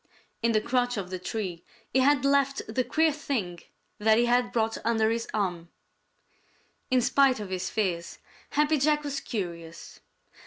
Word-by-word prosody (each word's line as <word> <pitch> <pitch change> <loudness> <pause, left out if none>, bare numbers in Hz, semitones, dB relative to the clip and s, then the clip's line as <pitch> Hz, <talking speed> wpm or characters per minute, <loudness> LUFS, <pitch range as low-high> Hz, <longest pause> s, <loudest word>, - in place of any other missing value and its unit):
In 230 0 +2
the 215 - +3
crotch 245 0 0
of 185 -2 -5
the 185 - -4
tree 185 -3 -4 0.3
he 260 - +4
had 275 0 +3
left 275 0 +2
the 240 +4 0
queer 315 +6 +2
thing 235 - -3 0.4
that 220 +1 +4
he 240 - +4
had 245 0 +2
brought 225 -1 0
under 225 -1 +2
his 230 0 -2
arm. 180 -5 -2 1.2
In 255 -1 +3
spite 270 0 +3
of 205 -3 -6
his 185 0 -2
fears, 180 -6 -2 0.3
Happy 300 0 +2
Jack 300 +2 +2
was 285 -1 -3
curious. 170 -6 -6
230 Hz, 160 wpm, -27 LUFS, 190-270 Hz, 1.2 s, he